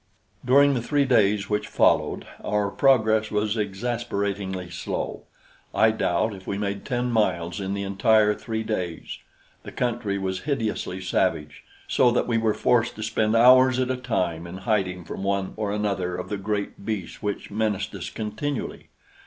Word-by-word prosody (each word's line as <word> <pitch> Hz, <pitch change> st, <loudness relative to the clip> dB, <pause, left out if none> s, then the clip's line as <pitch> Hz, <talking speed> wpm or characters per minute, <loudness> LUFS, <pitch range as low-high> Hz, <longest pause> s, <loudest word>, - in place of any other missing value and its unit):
During 140 Hz, +3 st, +5 dB
the 125 Hz, -, -1 dB
three 145 Hz, +3 st, +1 dB
days 105 Hz, -5 st, +3 dB
which 105 Hz, 0 st, -1 dB
followed, -, -, +2 dB, 0.2 s
our 105 Hz, -1 st, 0 dB
progress 110 Hz, -5 st, +3 dB
was 105 Hz, +1 st, 0 dB
exasperatingly 100 Hz, -4 st, -3 dB
slow. 85 Hz, -, -4 dB, 0.5 s
I 110 Hz, 0 st, +5 dB
doubt 110 Hz, 0 st, 0 dB
if 95 Hz, -1 st, -12 dB
we 100 Hz, -, -2 dB
made 100 Hz, -1 st, -3 dB
ten 125 Hz, -1 st, -1 dB
miles 90 Hz, -6 st, 0 dB
in 95 Hz, 0 st, -2 dB
the 100 Hz, -, -3 dB
entire 105 Hz, +2 st, +3 dB
three 110 Hz, +1 st, -4 dB
days. 90 Hz, -7 st, -4 dB, 0.4 s
The -, -, -9 dB
country 115 Hz, -5 st, -1 dB
was 95 Hz, -1 st, -2 dB
hideously 110 Hz, -9 st, -2 dB
savage, 75 Hz, -4 st, -1 dB, 0.2 s
so 125 Hz, -, +4 dB
that -, -, +1 dB
we 115 Hz, -2 st, +1 dB
were 110 Hz, -1 st, +1 dB
forced 120 Hz, -2 st, +2 dB
to 110 Hz, -, -6 dB
spend 110 Hz, 0 st, +1 dB
hours 130 Hz, +2 st, +7 dB
at 130 Hz, 0 st, 0 dB
a -, -, 0 dB
time 85 Hz, -9 st, -2 dB
in 90 Hz, +2 st, -7 dB
hiding 90 Hz, -5 st, 0 dB
from -, -, -6 dB
one 100 Hz, -1 st, -1 dB
or 105 Hz, -2 st, -2 dB
another 100 Hz, -4 st, -1 dB
of 90 Hz, -, -6 dB
the 105 Hz, -, -2 dB
great 100 Hz, 0 st, -3 dB
beasts 100 Hz, -5 st, -4 dB
which 105 Hz, 0 st, -4 dB
menaced 105 Hz, -1 st, -1 dB
us 90 Hz, -3 st, -5 dB
continually. 115 Hz, +6 st, -4 dB
105 Hz, 165 wpm, -25 LUFS, 100-115 Hz, 0.5 s, hours